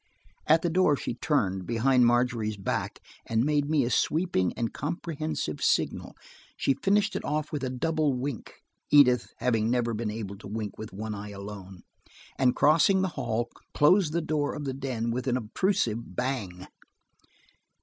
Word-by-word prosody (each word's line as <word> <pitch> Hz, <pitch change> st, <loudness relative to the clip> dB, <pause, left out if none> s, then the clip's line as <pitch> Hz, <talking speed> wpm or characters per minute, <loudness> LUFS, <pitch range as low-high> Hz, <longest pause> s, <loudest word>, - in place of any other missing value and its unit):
At 160 Hz, +1 st, +5 dB
the 175 Hz, -, +1 dB
door 180 Hz, -4 st, +4 dB
she 130 Hz, -, -4 dB
turned, 95 Hz, -, -1 dB
behind 125 Hz, +1 st, +3 dB
Margery's 120 Hz, -3 st, +1 dB
back, 95 Hz, -, -3 dB, 0.3 s
and 115 Hz, 0 st, +1 dB
made 145 Hz, -1 st, +1 dB
me 150 Hz, -5 st, +2 dB
a 120 Hz, -, -2 dB
sweeping 155 Hz, -, +1 dB
and 115 Hz, -2 st, -3 dB
comprehensive 155 Hz, -, -4 dB
signal. -, -, 0 dB, 0.4 s
She 135 Hz, -, +2 dB
finished 200 Hz, +9 st, +1 dB
it -, -, -3 dB
off 150 Hz, +1 st, -2 dB
with 145 Hz, -3 st, -3 dB
a 130 Hz, -, -1 dB
double 150 Hz, +2 st, 0 dB
wink, 130 Hz, -2 st, -6 dB, 0.3 s
Edith 130 Hz, -4 st, +5 dB
having 115 Hz, -3 st, +1 dB
never 120 Hz, -1 st, +1 dB
been 110 Hz, 0 st, -2 dB
able 105 Hz, -2 st, -6 dB
to -, -, -10 dB
wink 105 Hz, -1 st, -4 dB
with 110 Hz, -, -7 dB
one 105 Hz, +3 st, -5 dB
eye 105 Hz, 0 st, -7 dB
alone, 100 Hz, -2 st, -9 dB, 0.5 s
and 125 Hz, -2 st, +2 dB
crossing 165 Hz, +6 st, +4 dB
the 190 Hz, -, 0 dB
hall, 120 Hz, -7 st, -2 dB, 0.2 s
closed 165 Hz, +2 st, +4 dB
the 170 Hz, +2 st, 0 dB
door 155 Hz, -2 st, -1 dB
of 150 Hz, -, -5 dB
the 135 Hz, -, -2 dB
den 130 Hz, -4 st, -3 dB
with 125 Hz, +2 st, -3 dB
an 125 Hz, -1 st, +2 dB
obtrusive 120 Hz, -, -1 dB
bang. 105 Hz, -9 st, -3 dB
125 Hz, 165 wpm, -27 LUFS, 110-150 Hz, 0.5 s, At